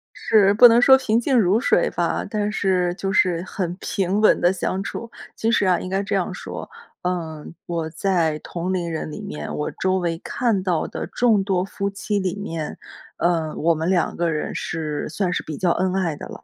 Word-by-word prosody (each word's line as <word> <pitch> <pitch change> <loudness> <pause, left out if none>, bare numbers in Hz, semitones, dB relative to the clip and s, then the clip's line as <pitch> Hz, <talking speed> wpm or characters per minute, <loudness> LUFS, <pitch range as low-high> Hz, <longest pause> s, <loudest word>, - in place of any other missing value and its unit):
是， 205 -3 +4
不 245 +4 +9
能 230 0 +5
说 265 +2 +8
平 230 -4 +1
静 255 +2 +1
如 195 +2 +3
水 260 - +2
吧， - - -1
但 210 -2 -1
是 185 -4 +1
就 195 0 -3
是 180 -3 +2
很 180 -2 -4
平 195 +1 -1
稳 215 - +5
地 175 +1 +3
相 190 +1 -2
处。 230 +3 -6 0.2
其 225 - 0
实 215 - +2
啊， 180 -2 +3
应 185 - -6
该 195 +1 0
这 200 - -2
样 - - 0
说， - - -7 0.3
嗯， 165 -4 -4
我 165 -2 -3
在 165 -2 0
同 175 +3 -4
龄 175 -2 -1
人 160 -1 -4
里 - - -7
面， 75 0 -6
我 150 - -2
周 190 0 0
围 170 -2 -2
看 225 -2 0
到 180 -4 0
的 - - -5
众 225 -5 +2
多 190 -2 0
夫 200 0 -3
妻 200 +1 -2
里 190 -1 -2
面， 165 -7 -5 0.4
呃， 165 -3 0
我 165 +2 +2
们 160 +2 -2
两 180 -3 +1
个 170 0 0
人 155 -1 -3
是 155 -2 -3
算 180 +3 -1
是 - - -1
比 155 -2 -6
较 180 -2 +2
恩 185 +1 0
爱 175 -5 0
的 - - -8
了， - - -11
185 Hz, 225 characters per minute, -22 LUFS, 170-200 Hz, 0.4 s, 不